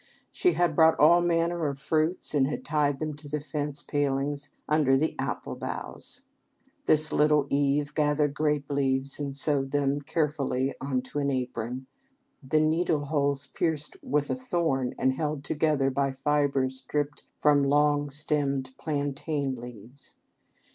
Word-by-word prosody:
She 360 Hz, -, +2 dB
had 175 Hz, -1 st, +1 dB
brought 160 Hz, -1 st, +5 dB
all 170 Hz, +4 st, +7 dB
manner 170 Hz, -1 st, +1 dB
of 140 Hz, -1 st, -4 dB
fruits 155 Hz, +5 st, 0 dB
and 135 Hz, -3 st, +3 dB
had 150 Hz, -, -4 dB
tied 145 Hz, -2 st, +1 dB
them 155 Hz, 0 st, -3 dB
to 145 Hz, -1 st, -11 dB
the 150 Hz, +1 st, -1 dB
fence 145 Hz, -1 st, -4 dB
palings 145 Hz, 0 st, -1 dB, 0.2 s
under 150 Hz, -3 st, +3 dB
the 155 Hz, +4 st, 0 dB
apple -, -, -3 dB
boughs. 255 Hz, +1 st, -7 dB, 0.6 s
This 155 Hz, 0 st, +3 dB
little 150 Hz, -1 st, +4 dB
Eve 145 Hz, +1 st, +1 dB
gathered 150 Hz, -1 st, +2 dB
grape 150 Hz, -2 st, 0 dB
leaves 135 Hz, 0 st, 0 dB
and 140 Hz, -2 st, -3 dB
sewed 140 Hz, -1 st, 0 dB
them 145 Hz, 0 st, 0 dB
carefully 140 Hz, -4 st, -1 dB
into 130 Hz, +1 st, -2 dB
an 140 Hz, -1 st, 0 dB
apron, 125 Hz, -1 st, -3 dB, 0.6 s
the 145 Hz, +3 st, +1 dB
needle 155 Hz, -1 st, +1 dB
holes 140 Hz, -1 st, 0 dB
pierced 155 Hz, +2 st, -2 dB
with 145 Hz, 0 st, 0 dB
a -, -, +1 dB
thorn 170 Hz, -, -1 dB
and 130 Hz, 0 st, +2 dB
held 150 Hz, 0 st, -2 dB
together 150 Hz, -3 st, +1 dB
by 135 Hz, 0 st, 0 dB
fiber 140 Hz, -1 st, +1 dB
stripped 145 Hz, +3 st, -4 dB
from 145 Hz, -1 st, +4 dB
long 145 Hz, +1 st, +3 dB
stemmed 140 Hz, -2 st, -1 dB
plantain 145 Hz, -2 st, -2 dB
leaves. 120 Hz, +2 st, -11 dB
145 Hz, 145 wpm, -27 LUFS, 135-150 Hz, 0.6 s, all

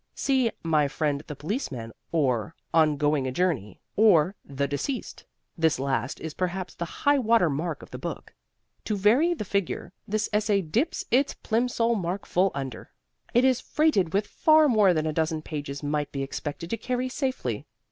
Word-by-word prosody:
See 260 Hz, -4 st, +2 dB
"My 155 Hz, -3 st, +3 dB
friend 145 Hz, 0 st, -1 dB
the 150 Hz, -, -6 dB
Policeman," 145 Hz, -, -4 dB, 0.2 s
or 140 Hz, -2 st, 0 dB, 0.2 s
"On 155 Hz, -2 st, +4 dB
Going 145 Hz, -2 st, +1 dB
a -, -, -2 dB
Journey," 130 Hz, -, -1 dB, 0.2 s
or 195 Hz, -5 st, +5 dB
"The 140 Hz, 0 st, -2 dB
Deceased" 145 Hz, -, -4 dB, 0.3 s
this 160 Hz, -2 st, +2 dB
last 135 Hz, -2 st, -1 dB
is 160 Hz, -1 st, -6 dB
perhaps 185 Hz, 0 st, -3 dB
the 170 Hz, 0 st, -7 dB
high 285 Hz, 0 st, +5 dB
water 225 Hz, -, +3 dB
mark 155 Hz, +3 st, -3 dB
of -, -, -14 dB
the -, -, -6 dB
book. -, -, -6 dB, 0.5 s
To 210 Hz, -, -1 dB
vary 255 Hz, -, +4 dB
the 210 Hz, -, -5 dB
figure, 190 Hz, -2 st, -2 dB
this 215 Hz, +1 st, 0 dB
essay 210 Hz, -2 st, +2 dB
dips 235 Hz, -, -1 dB
its 270 Hz, +4 st, +3 dB
Plimsoll 235 Hz, 0 st, +1 dB
mark 190 Hz, -2 st, -2 dB
full 185 Hz, +2 st, +2 dB
under. 135 Hz, -2 st, -5 dB, 0.5 s
It 245 Hz, +2 st, +5 dB
is 260 Hz, -2 st, +3 dB
freighted 300 Hz, -, +2 dB
with 200 Hz, +3 st, +1 dB
far 310 Hz, +6 st, +4 dB
more 215 Hz, -7 st, +5 dB
than 155 Hz, 0 st, 0 dB
a 155 Hz, -, -1 dB
dozen 160 Hz, 0 st, -1 dB
pages 145 Hz, -2 st, -5 dB
might 145 Hz, 0 st, -1 dB
be 135 Hz, -1 st, -3 dB
expected 145 Hz, +4 st, -5 dB
to 230 Hz, -, 0 dB
carry 250 Hz, +3 st, -2 dB
safely. 260 Hz, 0 st, -3 dB
175 Hz, 175 wpm, -26 LUFS, 150-230 Hz, 0.5 s, or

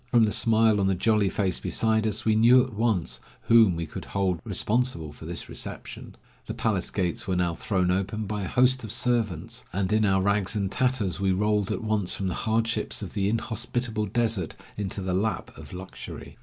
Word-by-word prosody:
From 120 Hz, -2 st, +4 dB
the 105 Hz, -, 0 dB
smile 110 Hz, -1 st, +3 dB
on 95 Hz, -, +2 dB
the 95 Hz, -, +2 dB
jolly 105 Hz, +1 st, +2 dB
face 95 Hz, -2 st, 0 dB
beside 110 Hz, -1 st, +1 dB
us, 110 Hz, +2 st, -2 dB
we 110 Hz, -1 st, +3 dB
knew 120 Hz, +3 st, +6 dB
at 130 Hz, -2 st, -7 dB
once 105 Hz, -5 st, 0 dB, 0.2 s
whom 110 Hz, -6 st, +5 dB
we 85 Hz, 0 st, -3 dB
could -, -, -8 dB
hold 95 Hz, -3 st, -1 dB
responsible 110 Hz, -, -1 dB
for 80 Hz, +2 st, -11 dB
this 85 Hz, 0 st, -4 dB
reception. -, -, -7 dB, 0.3 s
The -, -, -4 dB
palace -, -, 0 dB
gates 90 Hz, -3 st, -2 dB
were 95 Hz, -, 0 dB
now 90 Hz, -1 st, +1 dB
thrown 90 Hz, 0 st, 0 dB
open 100 Hz, +3 st, -1 dB
by 105 Hz, +1 st, -3 dB
a 95 Hz, -, -3 dB
host 130 Hz, +2 st, +3 dB
of 110 Hz, -, -5 dB
servants, 115 Hz, -1 st, -1 dB
and 95 Hz, +1 st, -1 dB
in 110 Hz, 0 st, +3 dB
our 95 Hz, -2 st, +3 dB
rags 100 Hz, +1 st, +1 dB
and 100 Hz, -2 st, -1 dB
tatters 125 Hz, -9 st, 0 dB
we 95 Hz, -1 st, +2 dB
rolled 105 Hz, +1 st, +1 dB
at -, -, -3 dB
once 105 Hz, -4 st, 0 dB
from 95 Hz, -1 st, -2 dB
the -, -, -2 dB
hardships 115 Hz, 0 st, -1 dB
of 90 Hz, -, -7 dB
the 100 Hz, -1 st, 0 dB
inhospitable 115 Hz, 0 st, -2 dB
desert 110 Hz, -5 st, -1 dB, 0.2 s
into 100 Hz, -1 st, -4 dB
the 90 Hz, -1 st, -1 dB
lap 100 Hz, 0 st, -2 dB
of -, -, -12 dB
luxury. 95 Hz, +1 st, -9 dB
105 Hz, 200 wpm, -26 LUFS, 95-115 Hz, 0.3 s, knew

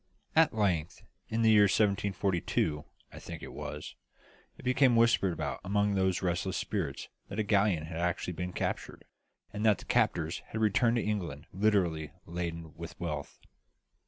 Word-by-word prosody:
At 160 Hz, -6 st, +5 dB
length 90 Hz, -7 st, 0 dB, 0.3 s
in 115 Hz, +1 st, 0 dB
the 110 Hz, -, +6 dB
year 105 Hz, -1 st, +7 dB
1742, 95 Hz, -7 st, +1 dB, 0.3 s
I -, -, -9 dB
think -, -, -8 dB
it -, -, -8 dB
was 75 Hz, 0 st, -6 dB, 0.6 s
it -, -, -13 dB
became 125 Hz, 0 st, +4 dB
whispered 115 Hz, -5 st, +4 dB
about 85 Hz, -, -3 dB
among 100 Hz, +1 st, +1 dB
those 95 Hz, -1 st, +1 dB
restless 90 Hz, +1 st, -1 dB
spirits 85 Hz, -10 st, -3 dB, 0.2 s
that 100 Hz, -, -7 dB
a 110 Hz, -, +2 dB
galleon 100 Hz, -6 st, +2 dB
had 80 Hz, +1 st, -6 dB
actually 90 Hz, +1 st, -1 dB
been 90 Hz, +1 st, -4 dB
captured, -, -, -4 dB, 0.5 s
and 105 Hz, +1 st, -3 dB
that 105 Hz, -3 st, +5 dB
the -, -, -12 dB
captors 80 Hz, -1 st, +1 dB
had 110 Hz, -, -4 dB
returned 110 Hz, +2 st, +3 dB
to 120 Hz, -, +1 dB
England 85 Hz, -8 st, -3 dB
literally 90 Hz, -7 st, +1 dB
laden 85 Hz, -2 st, -5 dB
with 85 Hz, 0 st, -9 dB
wealth. 75 Hz, -5 st, -4 dB
95 Hz, 160 wpm, -31 LUFS, 85-105 Hz, 0.6 s, year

